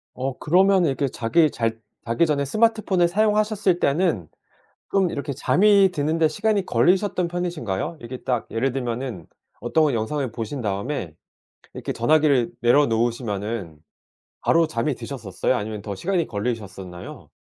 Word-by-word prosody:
어 130 +1 -3
그러면은 185 +1 +3
이렇게 140 +1 0
자기 135 +7 +2
잘 115 -3 -2 0.3
자기 115 +8 +2
전에 145 -2 0
스마트폰을 215 - +2
사용하셨을 210 -1 +1
때는 140 - +1 0.6
좀 190 -3 +2
이렇게 140 -1 -4
잠이 195 +6 +4
드는 155 0 -1
데 160 -1 +4
시간이 205 +5 0
걸리셨던 180 - +2
편이신가요? 170 - -3
이렇게 120 +2 -7
딱 125 -3 -1
예를 120 +4 0
들면은 125 -7 -4 0.3
어떤 150 +6 +2
영상을 125 +4 -2
보신 115 +5 -5
다음에 100 - -3 0.6
이렇게 - - -5
전화기를 140 -2 +2
내려 130 +5 +5
놓으시면은 110 - -2 0.6
바로 165 -1 +3
잠이 120 +3 -1
드셨었어요? 120 -2 -3
아니면 105 -2 -4
더 100 -1 -5
시간이 175 - -1
걸리셨었나요? 100 -5 -6
135 Hz, 355 characters per minute, -23 LUFS, 115-175 Hz, 0.6 s, 내려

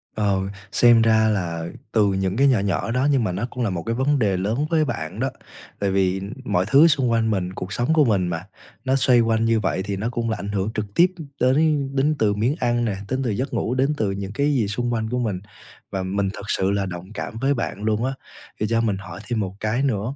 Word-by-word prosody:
Ờ, 100 -2 +1 0.3
xem 120 -1 +6
ra 110 -1 +4
là 85 -5 -2 0.3
từ 105 -2 +3
những 95 +2 -1
cái 140 - +5
nhỏ 130 -6 +4
nhỏ 100 +1 -1
đó 125 +3 +1
nhưng 135 -4 +2
mà 95 - 0
nó 100 +6 -2
cũng 125 - -4
là 115 - +1
một 90 -3 -3
cái 115 - -2
vấn 135 +3 +1
đề 100 -5 +1
lớn 110 +10 -1
với 160 -2 +2
bạn 80 - -4
đó. - - 0 0.5
Tại 100 -1 0
vì 95 0 +1 0.2
mọi 90 -6 +1
thứ 140 +8 +7
xung 135 -6 +2
quanh 115 -1 +2
mình, 95 -2 -2
cuộc 95 +1 -5
sống 120 +7 +1
của 155 -2 +5
mình 100 -6 +2
mà, 85 +1 -4 0.4
nó 130 +1 +2
xoay 130 -2 +5
quanh 115 0 +1
như 115 -1 +3
vậy 95 - -1
thì 100 0 -3
nó 110 +4 -2
cũng 120 -1 -2
là 110 - -1
ảnh 100 - -5
hưởng 100 0 -1
trực 105 - -2
tiếp 175 - +7 0.3
đến 140 +2 +2
đến 145 +3 +2
từ 105 -2 +3
miếng 115 +8 0
ăn 120 0 +1
này, 105 -4 -2
đến 130 +1 -1
từ 125 - -1
giấc 125 +6 -2
ngủ, 125 - -1
đến 135 +3 +2
từ 105 -6 0
những 95 0 -5
cái 145 +5 +1
gì 120 -7 +1
xung 120 +4 -1
quanh 110 -1 -2
của 125 +2 -1
mình. 105 -7 -1 0.5
Và 95 -1 -2
mình 95 +1 -1
thực 100 - -8
sự 95 -1 +1
là 100 -1 0
đồng 90 +2 -7
cảm 110 - -5
với 140 +1 +2
bạn 115 -5 -4
luôn 110 +2 0
á. 135 - -1 0.5
Thì 105 - 0
cho 115 0 +2
mình 105 -4 0
hỏi 90 -3 -9
thêm 120 -2 -1
một 95 -2 -3
cái 110 +5 0
nữa, 120 -1 -1
110 Hz, 255 wpm, -23 LUFS, 100-125 Hz, 0.5 s, thứ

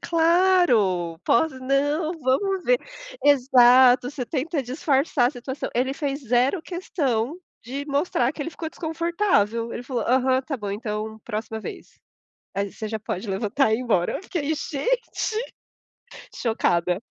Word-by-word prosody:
"claro, 325 - +3
poss 320 +7 +3
não, 290 +5 0
vamos 360 +8 0
ver" - - +3 0.4
Exato, 255 -2 +6
você 270 -4 -5
tenta 300 +3 -2
disfarçar 270 0 +1
a - - -4
situação 260 +1 -6
ele 260 +3 0
fez 285 -1 -3
zero 250 - +2
questão 295 -7 -2 0.3
de 270 +4 -5
mostrar 280 -3 0
que 295 - -5
ele 325 - -5
ficou 320 +1 -6
desconfortável, 320 - 0
ele 245 - -6
falou: 245 -3 -2
"Aham, 260 +1 +2
tá 275 +1 -4
bom 205 -4 -4
então, 215 0 -4
próxima 220 0 -4
vez. - - -10 0.6
Aí, 200 0 -2
você 220 - -6
já 220 +1 -3
pode 200 0 -5
levantar 210 +5 +1
e - - +5
ir - - -4
embora", 200 -8 0
fiquei: 315 -4 -2
"Gente! 470 - -2 1.0
Chocada!" 180 -6 0
260 Hz, 140 wpm, -24 LUFS, 230-315 Hz, 1.0 s, Exato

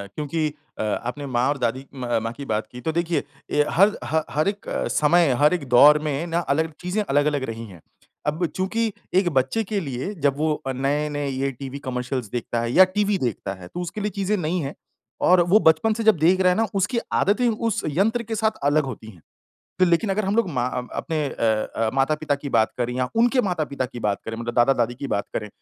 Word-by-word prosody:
क्योंकि 155 +1 -1 0.3
अ, - - 0
आपने 125 +6 -3
माँ 125 -1 +1
और 145 - 0
दादी 130 +1 -2
म 120 -3 -1
माँ 115 - -2
की 140 +3 -8
बात 110 -2 -2
की 125 - -9
तो 160 - -1
देखिए, 170 0 0 0.3
ये 150 0 +3
हर 200 +4 +4
ह 155 +6 0
हर 155 +4 0
एक 200 0 -3 0.3
समय, 165 +2 +4
हर 150 +3 +5
एक 160 -7 -3
दौर 145 +5 +7
में 150 +2 -2
ना 170 0 0
अलग 160 0 0
चीज़ें 180 +4 -1
अलग-अलग 145 -3 +1
रही 115 0 -6
है। 90 -4 -13 0.5
अब 155 +4 0
चूँकि 220 +4 0 0.2
एक 185 -1 +4
बच्चे 135 - +1
के 210 0 -2
लिए 140 +3 -4
जब 140 -1 +2
वो 155 +1 +1
अ, - - 0
नए-नए 145 +2 -1
ये 135 +1 -1
टीवी 135 +2 -7
कमर्शियल्स 125 -3 -4
देखता 120 -1 -2
है 120 0 -2
या 185 - +8
टीवी 205 -1 +2
देखता 115 - -3
है, 95 -2 -11
तो 175 - -7
उसके 175 +4 -5
लिए 210 +1 -1
चीज़ें 200 +1 0
नई 175 0 -1
हैं 140 -2 -4 0.5
और 180 0 +6
वो 200 +5 +6
बचपन 160 +5 +4
से 225 +1 -3
जब 220 -4 +5
देख 170 +5 +3
रहा 185 - +5
है 180 - 0
ना, 225 0 +2
उसकी 205 +5 +1
आदतें 230 +5 +2
उस 225 0 -1
यंत्र 210 - +1
के 225 0 -4
साथ 220 0 0
अलग 145 +2 +3
होती 120 -4 -7
हैं। 90 -7 -15 0.6
तो 185 - +5
लेकिन 175 +4 +2
अगर 205 +2 0
हम 195 +2 0
लोग 230 -4 +2
मा 125 -5 -1 0.3
अपने 160 -3 -2
अ - - -8 0.4
अ, 115 -1 +1
माता-पिता 145 +2 +1
की 140 0 -6
बात 110 - +2
करें 120 0 -1
या 125 0 -1
उनके 240 +3 +3
माता-पिता 155 - -2
की 120 - -9
बात 100 -2 0
करें 115 0 -5
मतलब 120 +1 -4
दादा-दादी 120 -1 +3
की 135 +3 -6
बात 100 -6 -1
करें 105 - -3
150 Hz, 225 wpm, -23 LUFS, 125-185 Hz, 0.6 s, या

